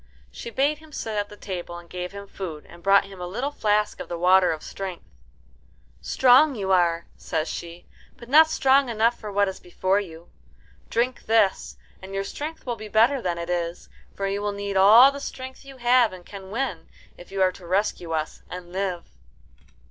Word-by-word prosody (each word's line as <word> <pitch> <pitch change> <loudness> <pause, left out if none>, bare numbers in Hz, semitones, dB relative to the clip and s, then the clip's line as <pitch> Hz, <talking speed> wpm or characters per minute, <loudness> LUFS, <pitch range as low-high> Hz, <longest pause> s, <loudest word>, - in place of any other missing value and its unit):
She - - -8
bade 285 +5 +1
him 315 -1 -17
sit 225 -6 -4
at 205 0 -1
the 210 - -12
table, 175 -4 -6
and 175 0 -12
gave 180 0 -5
him 200 0 -8
food 175 -6 -7
and 170 - -14
brought 195 +2 +4
him 195 -2 -11
a 180 - -4
little 250 +10 -3
flask 210 -6 0
of - - -7
the 170 - -3
water 180 +1 +5
of 155 -1 -5
strength. 190 -3 -7 1.0
"Strong 265 - +5
you 195 -3 -2
are," 170 -2 +2
says 155 -1 -2
she, 170 0 -7 0.3
"but 235 - -12
not 310 +5 +7
strong 270 -3 +3
enough 230 +1 +1
for 210 -2 -7
what 200 0 +2
is 190 - -5
before 185 +2 0
you. 170 -4 -9 0.6
Drink 245 +2 -1
this, 220 -3 +2 0.2
and 190 +1 -8
your 195 - -1
strength 305 +10 -6
will 240 -2 -2
be 215 0 -9
greater 235 +6 +3
than 175 -4 -2
it 170 +1 -4
is; 170 0 -3 0.3
for 195 - -3
you 200 +1 -2
will 205 0 -2
need 200 0 -4
all 220 +8 +8
the 280 - -7
strength 260 -1 -8
you 270 -1 -12
have 245 -1 +4
and 180 -1 -11
can 195 -2 -10
win, 215 -7 -3 0.3
if 175 - -14
you 195 - -4
are 185 - +3
to 180 -1 -13
rescue 185 -2 -1
us 155 -1 -3
and 180 -1 -8
live." 185 -3 -2
200 Hz, 200 wpm, -24 LUFS, 180-240 Hz, 1.0 s, all